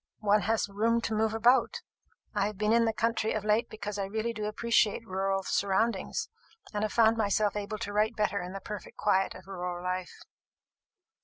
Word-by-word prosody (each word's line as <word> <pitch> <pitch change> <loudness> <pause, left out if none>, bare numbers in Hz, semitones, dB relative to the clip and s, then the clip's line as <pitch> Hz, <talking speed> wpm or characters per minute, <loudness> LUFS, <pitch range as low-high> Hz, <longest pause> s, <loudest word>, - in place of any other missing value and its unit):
One 210 0 +3
has 220 0 +1
room 225 +4 +1
to 225 - -2
move 220 0 +1
about. 245 - +3 0.5
I 205 -2 +1
have 210 -2 -6
been 210 +2 +2
in 230 0 +4
the 225 - +2
country 225 -1 0
of 215 -2 -3
late 215 +2 +2
because 210 -1 -5
I 195 - 0
really 220 +4 -2
do 215 -1 -4
appreciate 225 0 +1
rural 195 -1 -1
surroundings, 200 +2 0 0.5
and 210 0 -1
have 215 - -1
found 225 -1 +4
myself 210 -1 +1
able 210 +1 -3
to 205 -2 -5
write 215 +2 +1
better 205 -2 0
in 180 +1 -6
the 195 - -6
perfect 210 +1 -8
quiet 195 -2 +1
of 185 - -12
rural 180 -2 -5
life." 185 0 -4
210 Hz, 190 wpm, -29 LUFS, 195-225 Hz, 0.5 s, in